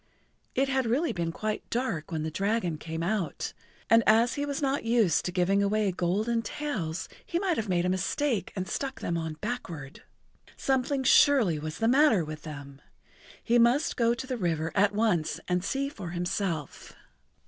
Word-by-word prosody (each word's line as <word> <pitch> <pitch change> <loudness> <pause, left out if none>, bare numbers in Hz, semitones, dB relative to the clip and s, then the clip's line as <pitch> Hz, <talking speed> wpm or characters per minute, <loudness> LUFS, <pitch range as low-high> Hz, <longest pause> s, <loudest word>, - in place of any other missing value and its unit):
It 270 +1 +2
had 265 -2 0
really 285 +8 +1
been 170 -2 -2
quite 215 +5 -4
dark 230 -12 -2
when 160 -2 -2
the 160 - -3
dragon 195 -3 -1
came 160 +1 -4
out, 190 -1 -2 0.3
and 225 0 +6
as 230 +3 +5
he 290 0 -2
was 280 0 -2
not 275 -1 0
used 225 -8 +2
to 180 - -1
giving 185 +3 +2
away 205 0 +1
golden 205 +7 0
tails, 220 - -4 0.2
he 340 - -2
might 365 -2 +1
have 220 -6 -3
made 175 -1 +1
a - - +1
mistake 195 - -1
and 185 -1 -3
stuck 270 +8 -4
them 170 - -1
on 160 -2 -3
backward. 170 - -5 0.6
Something 265 +1 0
surely 245 - +5
was 155 +1 -5
the 225 - +1
matter 245 - +4
with 155 0 -7
them. 145 -3 -9 0.6
He 240 +1 +3
must 245 +7 +3
go 235 0 +2
to 240 - -6
the 255 -1 -3
river 165 -5 -1
at 205 0 +3
once 205 -8 +1
and 180 0 0
see 275 +7 -1
for 205 - -7
himself. 175 -3 -3
205 Hz, 180 wpm, -28 LUFS, 170-245 Hz, 0.6 s, and